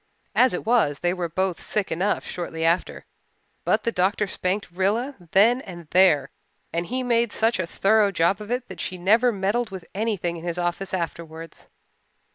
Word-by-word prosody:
As 255 -7 +4
it - - -5
was, 220 -11 +2
they 175 0 +1
were 175 -2 -3
both 185 +1 -1
sick 210 -2 -2
enough 185 +6 0
shortly 165 -2 -4
after. 170 +2 0 0.6
But 215 - +1
the 230 - 0
doctor 200 +2 +1
spanked 185 0 -2
Rilla 205 +10 0 0.2
then 230 +8 +4
and 175 - -10
there 165 -7 +4 0.4
and 170 +1 -1
he 255 +1 -2
made 235 -2 +1
such 225 -2 +1
a 180 - -1
thorough 210 +3 +3
job 190 +2 +1
of 210 - -8
it 250 +1 -2
that - - -8
she 185 - -4
never 220 +7 +4
meddled 210 +3 -1
with 190 -4 -8
anything 195 -5 -1
in 165 - -10
his 175 0 -3
office 175 +2 -2
afterwards. 165 -2 -6
190 Hz, 180 wpm, -24 LUFS, 175-220 Hz, 0.6 s, As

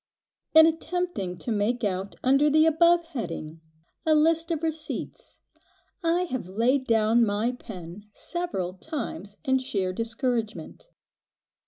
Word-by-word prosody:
IN 320 0 +10
attempting 325 - -2
to 235 - -5
make 220 +3 0
out 195 -1 -2
under 275 +3 +4
the 310 +2 +5
above 340 +2 +4
heading, 165 - -5 0.4
a 315 -1 +3
list 325 +2 +3
of 330 -2 -2
receipts, 320 -1 -4 0.6
I 340 +2 +2
have 255 - -4
laid 250 +7 +1
down 225 +1 +4
my 215 +2 +1
pen 205 -4 -10
several 260 - -2
times 205 - -6
in 265 0 +3
sheer 195 -8 -2
discouragement. 230 - -3
245 Hz, 125 wpm, -26 LUFS, 205-320 Hz, 0.6 s, IN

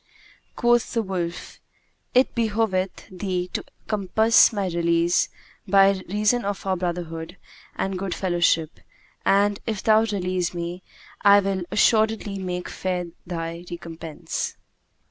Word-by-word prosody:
Quoth 240 -1 +2
the 230 -2 +1
wolf, 175 -3 -4 0.6
"It 255 +1 +4
behoveth 215 -5 -1
thee 180 -1 -2
to - - -2 0.2
compass 220 +3 +4
my 205 -3 -1
release, 170 -1 +2 0.4
by 195 -1 +5
reason 210 +5 +2
of 200 0 -3
our 190 -1 +1
brotherhood 175 -1 -4 0.4
and 190 -1 -2
good 190 -2 -3
fellowship; 170 -3 +1 0.5
and, 205 +1 +3
if 215 -4 -2
thou 220 0 +5
release 185 -4 -2
me, 175 +1 -4 0.4
I 200 0 +7
will 195 -2 -1
assuredly 215 -2 +2
make 180 -1 -4
fair 180 -2 -3 0.2
thy 170 0 -4
recompense." 165 -2 -5
190 Hz, 120 wpm, -24 LUFS, 175-205 Hz, 0.6 s, I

